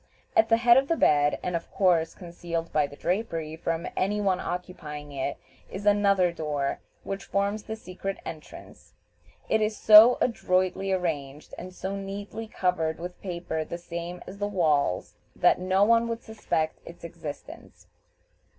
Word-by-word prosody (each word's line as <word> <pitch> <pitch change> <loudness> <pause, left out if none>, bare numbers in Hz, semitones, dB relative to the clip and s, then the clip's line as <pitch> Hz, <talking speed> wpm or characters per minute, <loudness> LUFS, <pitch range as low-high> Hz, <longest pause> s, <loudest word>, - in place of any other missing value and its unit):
At 335 - +4
the 225 - +5
head 240 +1 +6
of 270 +1 +3
the 330 - +2
bed, 145 - +3
and 180 - -2
of 165 - -4
course 175 -4 +2
concealed 170 -1 -5
by 150 -1 +3
the 140 - -12
drapery 165 -4 -2
from 165 +1 -3
any 205 +3 0
one 190 -3 +1
occupying 150 -6 -6
it, 140 0 -3 0.3
is 195 +2 -7
another 200 -3 +4
door, 150 -4 -2 0.2
which 195 0 -5
forms 200 +2 -1
the 220 +1 -6
secret 195 -1 -6
entrance. 155 -2 -11 0.5
It 220 - +2
is 215 0 0
so 220 +3 +9
adroitly 185 -4 0
arranged, 150 -6 -3
and 185 +1 -8
so 190 +2 -5
neatly 200 +3 -6
covered 170 -6 -1
with 180 +1 -7
paper 170 -4 -3
the 170 - -6
same 175 +1 -6
as 195 +2 -10
the 205 - 0
walls, 155 - +1 0.2
that - - +4
no 185 +2 +2
one 230 +2 +4
would 230 0 -4
suspect 160 -7 -2
its 170 - -13
existence. 160 -3 -9
180 Hz, 160 wpm, -27 LUFS, 165-205 Hz, 0.5 s, so